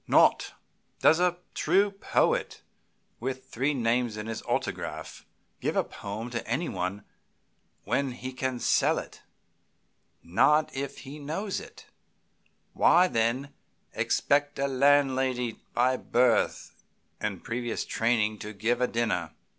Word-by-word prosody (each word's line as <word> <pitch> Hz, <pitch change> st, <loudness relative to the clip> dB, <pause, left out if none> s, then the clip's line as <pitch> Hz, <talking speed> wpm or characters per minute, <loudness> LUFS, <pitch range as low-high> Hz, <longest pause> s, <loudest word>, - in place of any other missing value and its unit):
Not. -, -, +4 dB, 0.5 s
Does 160 Hz, -, +6 dB
a 180 Hz, -1 st, +2 dB, 0.2 s
true 195 Hz, +5 st, +2 dB
poet, 195 Hz, -, 0 dB, 0.6 s
with 130 Hz, +2 st, -5 dB
three 140 Hz, +5 st, 0 dB
names 120 Hz, -2 st, 0 dB
on 105 Hz, -, -5 dB
his 115 Hz, 0 st, -4 dB
autograph, -, -, -3 dB, 0.3 s
give -, -, -1 dB
a -, -, +3 dB
poem 110 Hz, +4 st, -7 dB
to 115 Hz, -1 st, -4 dB
anybody 105 Hz, -, -2 dB, 0.8 s
when 140 Hz, -2 st, 0 dB
he 130 Hz, +1 st, -7 dB
can 130 Hz, -1 st, -2 dB
sell -, -, +3 dB
it? -, -, -7 dB, 1.0 s
Not 150 Hz, -, +3 dB
if 140 Hz, +1 st, -4 dB
he 145 Hz, +2 st, -9 dB
knows 165 Hz, +8 st, -3 dB
it. -, -, -13 dB, 0.9 s
Why, 180 Hz, +1 st, +5 dB
then, 125 Hz, +1 st, 0 dB, 0.4 s
expect 145 Hz, 0 st, +1 dB
a 140 Hz, -, +1 dB
landlady, 130 Hz, -3 st, +2 dB, 0.2 s
by 125 Hz, +2 st, +3 dB
birth 120 Hz, -2 st, +1 dB, 0.5 s
and -, -, -3 dB
previous 120 Hz, 0 st, -3 dB
training, 110 Hz, -2 st, +1 dB
to 105 Hz, +1 st, -7 dB
give 115 Hz, +5 st, 0 dB
a 125 Hz, -, +3 dB
dinner?" 115 Hz, -2 st, -1 dB
125 Hz, 125 wpm, -28 LUFS, 115-140 Hz, 1.0 s, Does